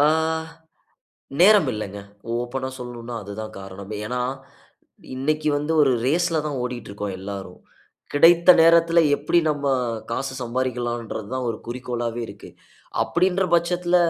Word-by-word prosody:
ஆ - - +6 1.4
நேரம் 200 -6 +6
இல்லங்க. 105 -1 -5 0.4
ஓப்பனா 130 +2 -3
சொல்லனுன்னா 120 -1 -7
அது 100 - -8
தான் 110 0 -7
காரணமே. 95 +2 -8
ஏன்னா 125 +2 -2 1.0
இன்னைக்கி 155 +3 0
வந்து 150 +2 -2
ஒரு 135 -2 +4
ரேஸ் 175 +6 +2
ல - - +3
தான் 140 -3 -3
ஓடிக்கிட்டு 125 -4 -5
இருக்கோம் 100 -1 -5
எல்லாரும். 95 -2 -7 0.5
கிடைத்த 170 +4 +6
நேரத்ல 170 0 +5 0.2
எப்டி 150 +4 +1
நம்ம 145 -1 -3 0.4
காசு 135 +3 -2
சம்பாரிக்கலான்றது 120 -3 -3
தான் 130 -1 -2
ஒரு 110 - -5
குறிக்கோளாவே 120 -1 -4
இருக்கு. - - -11 0.5
அப்டின்ற 185 +2 +1
பட்சத்துல, 175 +1 +2
130 Hz, 130 wpm, -23 LUFS, 115-160 Hz, 1.4 s, ஆ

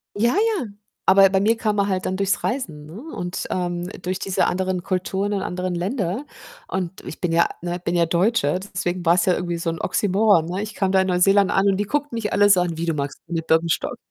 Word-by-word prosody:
Ja, 235 +4 +2
ja, 425 - +1 0.4
aber 195 0 +7
bei 190 0 +2
mir 215 +4 +3
kam 215 -2 -1
er 200 - +2
halt 190 -1 -1
dann 185 - -1
durchs 195 0 0
Reisen, 170 - -3
ne, 165 +9 -10
und, 175 0 -4
ähm, 175 -1 -2
durch 185 +1 -3
diese 195 -1 0
anderen 185 -1 -1
Kulturen 190 +2 -1
und 200 -2 -1
anderen 180 0 -3
Länder 190 +6 -2 0.4
und 185 -1 -4
ich - - -8
bin 180 - 0
ja, 165 +1 +4
ne 175 +1 -3
bin 175 0 -2
ja 170 -1 +3
Deutsche, 175 -1 +1
deswegen 185 -2 -4
war's 175 +1 +4
ja 185 - +3
irgendwie 175 -1 -3
so 165 0 -2
'n 165 - -4
Oxymoron, 200 -4 +2
ne? 180 +3 -3
Ich 215 0 -7
kam 195 -1 0
da 190 - +4
in 190 - +2
Neuseeland 195 +2 +4
an 195 - +2
und 195 -1 +2
die 205 - -1
guckten 290 +2 -2
mich 225 -2 -2
alle 205 0 +4
so 190 -2 +6
an: 175 -2 -1
„Wie 165 - -2
du 165 - 0
magst 140 -2 -4
keine 165 -1 -3
Birkenstock?" 165 0 +1
185 Hz, 235 wpm, -22 LUFS, 175-200 Hz, 0.4 s, aber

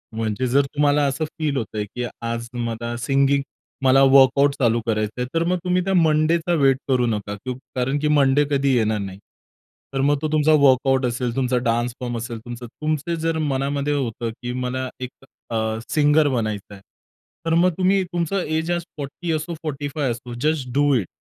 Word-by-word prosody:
म्हणजे 110 +3 -1
जर 140 +3 +3
तुम्हाला 145 +1 +2
असं 140 +4 -1
फील 150 -3 0
होतंय 110 -3 -3
की 125 - -2 0.2
आज 115 0 -3
मला 120 -1 -3
सिंगिंग 140 +3 +2 0.4
मला 135 +1 +5
वर्कआउट 135 +1 +5
चालू 120 -1 +3
करायचंय 110 +2 -1
तर 165 0 +2
मग 180 - +1
तुम्ही 180 0 +1
त्या 195 +1 -1
मंडेचा 165 0 +2
वेट 135 -1 +4
करू 125 -2 +2
नका 105 -2 -2
क 130 - -2 0.2
कारण 130 +3 0
की 150 - 0
मंडे 145 -1 +4
कधी 140 -1 +2
येणार 110 -2 +1
नाही. 95 -1 -6 0.7
तर 135 - 0
मग 145 0 +3
तो 155 - 0
तुमचा 155 0 +3
वर्कआउट 135 -1 +4
असेल, 120 0 -2
तुमचा 130 -1 +1
डान्स 120 +1 0
फॉर्म 120 -1 -3
असेल, 115 0 -5
तुमचं 120 0 -7
तुमचं 155 +5 -2
जर 165 0 -1
मनामध्ये 140 +2 -1
होतं 120 -4 -2
की 120 0 -4
मला 130 +1 -3
एक 125 - -4 0.4
अ, 110 -1 -1
सिंगर 150 0 +4
बनायचं 110 -5 -3
आहे, 95 - -12 0.6
तर 165 - +1
मग 180 +2 +5
तुम्ही 190 +1 +3
तुमचं 175 +1 -2
एज 160 0 -2
आज 175 0 -1
फोर्टी 145 +4 -5
असो, 155 +2 -3
फोर्टी 145 -2 -3
फाइव्ह 140 -5 0
असो, 120 +1 -7
जस्ट 150 -3 0
डू 145 0 +3
इट. 105 -8 0
135 Hz, 185 wpm, -22 LUFS, 120-150 Hz, 0.7 s, मला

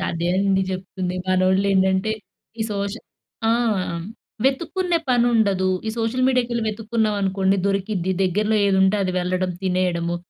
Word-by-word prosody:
అదే 170 +1 -2
అండి 195 0 +2
చెప్తుంది. 185 -1 -4
మనోళ్ళేంటంటే, 190 +2 +2 0.5
ఈ - - +3
సోషల్ 200 +2 -4 0.4
ఆ! - - +4 0.9
వెతుక్కునే 340 +6 +1
పనుండదు. 225 -6 +2 0.2
ఈ - - +1
సోషల్ 230 +3 0
మీడియాకెళ్లి 240 -2 0
వెతుకున్నాం 220 0 -1
అనుకోండి 195 0 +1
దొరికిద్ది. 195 -2 -1
దగ్గరలో 210 +4 +1
ఏదుంటే 190 +1 +3
అది 185 -1 -1
వెళ్లడం, 185 +1 -1
తినేయడము, 180 -2 0
195 Hz, 115 wpm, -22 LUFS, 185-220 Hz, 0.9 s, ఆ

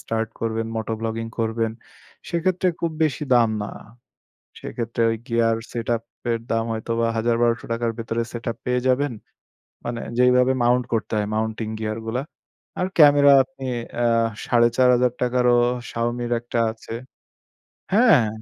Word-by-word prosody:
Start 115 -1 -2
করবেন, 115 0 -1
moto 110 0 -3
blogging 115 0 -3
করবেন 115 0 0 0.6
সেক্ষেত্রে 180 +2 +1
খুব 170 - 0
বেশি 150 -1 -1
দাম 120 -2 +5
না। 105 - -4 0.9
সেক্ষেত্রে 115 0 -3
ওই 115 - -1
গিয়ার 115 -1 +2 0.2
সেটআপ 115 -1 -1 0.3
এর 115 - -1
দাম 115 0 +1
হয়তো 110 +1 -5
বা 115 - +2
৳১০০০-১২০০-র 115 0 0
ভেতরে 115 0 -2
সেটআপ 115 -1 -4
পেয়ে 125 0 +1
যাবেন। 135 +2 +2 0.7
মানে 120 -1 -3 0.2
যেইভাবে 125 +1 +4
মাউন্ট 125 +1 +3
করতে 110 - -1
হয় 105 -1 0
মাউন্টিং 110 0 -2
গিয়ার 110 0 -3
গুলা। 120 +3 -2 0.6
আর 180 - +1
ক্যামেরা 145 -2 +7
আপনি 135 0 -13 0.4
আ - - +3 0.4
৳৪,৫০০-রও 125 0 +3 0.3
শাওমির 120 +1 -2
একটা 120 0 -5
আছে। 110 0 -13 1.0
হ্যাঁ। 200 - +5
120 Hz, 130 wpm, -23 LUFS, 115-125 Hz, 1.0 s, ক্যামেরা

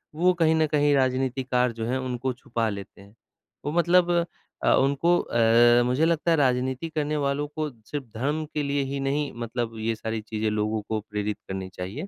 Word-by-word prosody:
वो 180 +3 +3
कहीं 160 0 +4
न 160 -1 +3
कहीं 145 -1 +2
राजनीतिकार 130 -1 +1
जो 115 -1 -5
हैं 125 +3 0
उनको 130 0 -2
छुपा 120 -3 -2
लेते 100 -1 -8
हैं। 100 +1 -17 0.5
वो 145 - -1
मतलब 175 +1 +3 0.5
अ, - - +4
उनको 140 +6 +3
अ, 120 - -3 0.5
मुझे 130 +6 +2
लगता 170 0 +1
है 165 - +4
राजनीति 130 +2 0
करने 150 -1 -1
वालों 140 +1 -1
को 155 -1 -2 0.2
सिर्फ़ 145 -2 -3
धर्म 150 +6 -1
के 150 - -1
लिए 140 0 0
ही 140 - -2
नहीं 145 0 -1
मतलब 115 -1 -3
ये 110 +1 -1
सारी 110 0 -4
चीज़ें 110 0 -2
लोगों 105 0 -1
को 110 - 0
प्रेरित 105 0 -2
करनी 95 -1 -5
चाहिए। 100 - -5
130 Hz, 190 wpm, -25 LUFS, 115-150 Hz, 0.5 s, कहीं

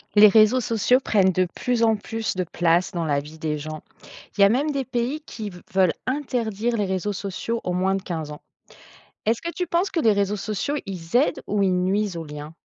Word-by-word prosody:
Les 210 +1 +9
réseaux 215 +4 +5
sociaux 235 +3 +2
prennent 195 -7 +3
de 185 0 +1
plus 245 -2 -1
en 225 -1 +4
plus 225 +1 -4
de 185 - 0
place 175 +1 +1
dans 170 -3 -2
la 145 -2 +1
vie 150 +2 -11
des 155 -1 -2
gens. 155 +1 -7 0.6
Il - - +2
y - - +9
a 200 - +7
même 270 +7 +1
des 275 -3 -2
pays 255 +4 -2
qui 220 -8 -7
v 180 -2 -12
veulent 185 -3 +4
interdire 240 -4 -1
les 205 - +1
réseaux 190 +2 -2
sociaux 200 +4 -4
aux 180 - -2
moins 190 +2 +1
de 195 - -4
15 160 -4 -4
ans. 150 - -10 0.8
Est-ce 225 +1 +1
que 340 - -3
tu 360 0 -3
penses 345 +4 0
que 335 - 0
les 225 -7 +4
réseaux 200 +1 0
sociaux, 215 +8 -2
ils 175 -2 -8
aident 260 +5 +2
ou 205 0 0
ils 185 -2 +2
nuisent 200 0 0
aux 165 - -5
liens? 150 +1 -8
205 Hz, 225 wpm, -23 LUFS, 180-235 Hz, 0.8 s, Les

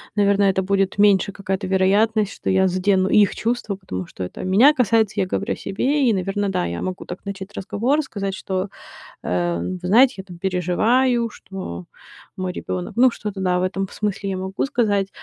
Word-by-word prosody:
наверно, 200 -1 +3
это 190 -1 +2
будет 195 +1 0
меньше 200 -1 +4
какая-то 195 0 -3
вероятность, 200 +3 +2
что - - -4
я 190 0 +3
задену 185 +1 +2
их 210 -2 +4
чувства. 230 -3 -2
Потому 95 - -6
что 90 - -7
это 90 - -7
меня 220 +11 +5
касается, 220 -5 +2
я 185 - 0
говорю 200 +4 -2
о - - -5
себе. 265 +6 0
И, - - +3
наверно, 195 +1 -1
да, 135 - -1
я 85 0 -4
могу 185 0 -4
так 180 - -8
начать 200 0 -7
разговор, 245 +10 0
сказать, 200 -8 -4
что, 190 +1 -3 0.5
э, 85 -1 -1
вы 185 - -4
знаете, 240 +9 +5
я 190 - -6
там 180 -3 -12
переживаю, 225 +7 +1
что 90 - -8 0.5
мой 185 -1 -3
ребенок 180 0 -5
ну, 255 +1 +6
что-то, 205 -3 -6
да, 180 -1 +1
в - - -1
этом 195 +1 -2
смысле 205 -1 -3
я 190 - -2
могу 190 +1 -3
сказать. 205 -7 +1
195 Hz, 190 wpm, -21 LUFS, 185-210 Hz, 0.5 s, ну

